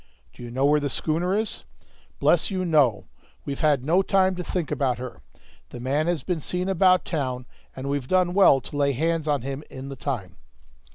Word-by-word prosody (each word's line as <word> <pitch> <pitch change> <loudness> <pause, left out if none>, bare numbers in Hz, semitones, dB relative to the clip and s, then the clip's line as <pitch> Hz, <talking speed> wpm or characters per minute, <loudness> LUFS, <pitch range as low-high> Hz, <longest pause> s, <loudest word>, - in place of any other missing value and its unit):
"Do - - -14
you 120 - -7
know 130 +3 0
where 150 +1 +4
the 145 -1 -2
schooner 175 +7 0
is?" 220 0 -2 0.5
"Bless - - +3
you, 185 -2 -2
no, 145 -10 +3 0.4
we've 140 -1 -4
had 145 -4 +2
no 175 +5 +4
time 190 -1 +2
to 180 - -4
think 175 -3 -3
about 135 -4 0
her; 125 - -8 0.5
the - - -9
man 140 +6 0
had 170 -6 -1
been 175 -4 -2
seen 180 +5 -3
about 185 -1 +3
town, 130 -6 -3 0.3
and 130 +1 -6
we've 140 -2 -2
done 180 +1 +2
well 185 -9 +5
to - - -9
lay 140 -1 +2
hands 160 +3 -1
on 145 -5 0
him 135 +2 -5
in 135 +1 -8
the 135 - -6
time." 125 -9 -5
150 Hz, 205 wpm, -25 LUFS, 135-180 Hz, 0.5 s, well